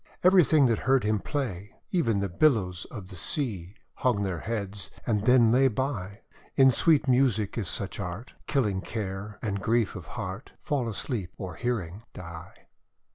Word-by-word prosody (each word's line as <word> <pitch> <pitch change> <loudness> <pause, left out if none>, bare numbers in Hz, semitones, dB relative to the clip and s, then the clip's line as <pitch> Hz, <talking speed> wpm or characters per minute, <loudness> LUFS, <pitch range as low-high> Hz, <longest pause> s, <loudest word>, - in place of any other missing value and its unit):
Everything 175 -6 +6
that 115 -3 +2
heard 135 -1 +3
him 105 0 +1
play, 105 - -4 0.2
Even 115 - +2
the 100 - 0
billows 95 - +2
of 100 -6 -9
the 95 - -10
sea, 95 - -3 0.2
Hung 115 -6 +1
their 95 -4 -2
heads, 100 -3 -4 0.2
and 105 -3 0
then 125 -3 +6
lay 130 +3 +5
by. 115 -5 -3 0.3
In 135 -1 +7
sweet 150 +3 +3
music 125 -6 +2
is 110 -6 -2
such 95 -2 -4
art, 100 +6 -5
Killing 110 -10 +1
Care 100 -1 -5
and 100 -3 -2
Grief 115 -1 +1
of - - -8
Heart - - -6
Fall 130 -6 0
asleep, 105 -4 -4
or 95 -3 -5
hearing 105 -3 -3
die. 85 -2 -10
110 Hz, 160 wpm, -28 LUFS, 95-130 Hz, 0.3 s, In